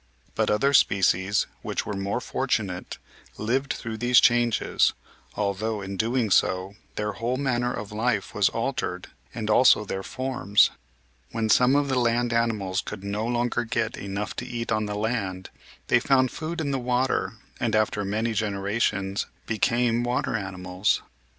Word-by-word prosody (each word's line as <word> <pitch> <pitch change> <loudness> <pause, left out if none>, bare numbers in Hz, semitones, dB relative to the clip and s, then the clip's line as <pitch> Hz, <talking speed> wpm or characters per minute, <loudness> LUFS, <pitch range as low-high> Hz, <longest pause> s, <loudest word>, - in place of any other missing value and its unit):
But - - 0
other 135 +7 +2
species 95 -4 +3 0.2
which - - -3
were 105 - -3
more 100 +4 -2
fortunate 110 -10 -2 0.4
lived 130 +6 0
through 110 -2 -6
these 120 +2 +5
changes, 120 -1 +3 0.4
although, 105 +1 -1
in 95 +1 -5
doing 115 +1 0
so, 95 +1 +2 0.2
their 105 0 -1
whole 115 +5 -2
manner 125 -3 0
of 105 -4 -6
life 110 -1 -1
was - - +3
altered - - -3 0.3
and 110 -3 -3
also 110 -1 +5
their 95 -1 -3
forms. 130 -3 +2 0.6
When 115 -1 -2
some 125 +5 +5
of 145 0 +2
the 130 -2 +1
land 120 0 +1
ani 115 0 +2
mals 95 -2 -2
could 95 - -7
no 105 +3 -2
longer 120 0 0
get 115 -1 -1
enough 100 +1 -4
to - - -3
eat 115 -1 -4
on 110 -1 +1
the 105 - -3
land, 105 -4 -2 0.4
they 125 - +4
found 130 0 +3
food 160 +1 -4
in 145 -2 -1
the 135 - 0
water 125 +1 0 0.3
and, 115 -3 0
after 110 -1 +1
many 110 +3 -1
generations, 100 -1 -1 0.2
became 120 +1 +1
water 120 -1 -1
animals. 95 -1 -1
110 Hz, 155 wpm, -25 LUFS, 100-120 Hz, 0.6 s, these